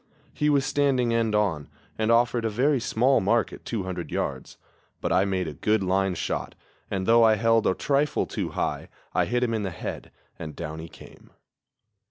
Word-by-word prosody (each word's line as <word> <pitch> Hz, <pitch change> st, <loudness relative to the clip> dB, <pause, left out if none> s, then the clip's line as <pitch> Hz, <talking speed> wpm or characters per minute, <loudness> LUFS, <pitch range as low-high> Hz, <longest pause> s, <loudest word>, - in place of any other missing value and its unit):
He 150 Hz, -, +1 dB
was 140 Hz, -2 st, +3 dB
standing 130 Hz, -5 st, +1 dB
end 115 Hz, -2 st, +1 dB
on, 90 Hz, -9 st, 0 dB, 0.3 s
and 110 Hz, +1 st, +1 dB
offered 120 Hz, 0 st, +3 dB
a 115 Hz, -, +1 dB
very 130 Hz, +6 st, +2 dB
small 125 Hz, +3 st, +2 dB
mark 110 Hz, +4 st, +1 dB
at -, -, -11 dB
200 95 Hz, -7 st, -4 dB
yards; -, -, -4 dB, 0.4 s
but -, -, -2 dB
I 95 Hz, +2 st, +3 dB
made 95 Hz, -3 st, -1 dB
a 75 Hz, -, -5 dB
good 105 Hz, +8 st, +1 dB
line 95 Hz, 0 st, +1 dB
shot, 80 Hz, -, -3 dB, 0.3 s
and, 95 Hz, -1 st, -2 dB
though 115 Hz, +2 st, +5 dB
I 110 Hz, -1 st, +5 dB
held 115 Hz, +1 st, +2 dB
a 95 Hz, -, +2 dB
trifle 145 Hz, +1 st, +1 dB
too -, -, -4 dB
high, -, -, -3 dB, 0.2 s
I -, -, +2 dB
hit 125 Hz, +1 st, 0 dB
him 115 Hz, -2 st, 0 dB
in 110 Hz, -, -1 dB
the 100 Hz, -, -2 dB
head, 85 Hz, -, -6 dB, 0.3 s
and 75 Hz, -2 st, -7 dB
down 80 Hz, -1 st, -6 dB
he 80 Hz, +1 st, -8 dB
came. -, -, -15 dB
110 Hz, 195 wpm, -26 LUFS, 95-120 Hz, 0.4 s, though